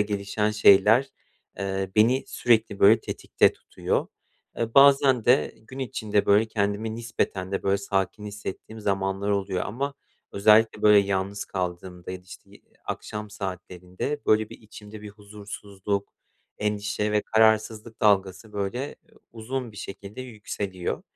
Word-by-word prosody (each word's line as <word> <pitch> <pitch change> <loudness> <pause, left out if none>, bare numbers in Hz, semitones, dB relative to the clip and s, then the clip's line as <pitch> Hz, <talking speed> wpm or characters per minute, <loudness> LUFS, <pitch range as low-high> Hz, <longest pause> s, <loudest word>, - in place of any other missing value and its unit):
gelişen 105 +1 -1
şeyler, 105 +5 +5 0.5
eee, 95 -1 -2
beni 125 +5 +4
sürekli 110 -4 +1
böyle 110 +3 +6
tetikte - - +1
tutuyor. - - -3 0.5
E, 115 -1 -2
bazen 135 -3 +6
de 125 +3 +3
gün 130 +5 -13
içinde 105 -5 -1
böyle 105 +2 +4
kendimi 105 +1 -1
nispeten 100 -5 -3
de 95 - -2
böyle 100 0 +1
sakin 100 +1 -2
hissettiğim 105 +2 -8
zamanlar 95 0 -1
oluyor 100 -2 -1
ama 140 +6 -3 0.4
özellikle, 105 +2 +4
böyle, 105 -1 +7
yalnız 100 0 -1
kaldığımda 90 -1 -5
ya 95 - -5
da, 90 - -22
işte, - - -14
yi - - -18 0.2
akşam 105 0 -6
saatlerinde 95 +6 -5
böyle 110 0 +3
bir - - -11
içimde 105 0 -12
bir 105 - -8
huzursuzluk, 100 -1 -6 0.5
endişe 105 0 -1
ve 105 - +3
kararsızlık 110 0 +1
dalgası, 100 +1 +1
böyle, 110 +8 -3 0.4
uzun 120 +1 -5
bir - - -15
şekilde 100 +3 -8
yükseliyor 100 -6 -5
105 Hz, 135 wpm, -25 LUFS, 100-110 Hz, 0.5 s, böyle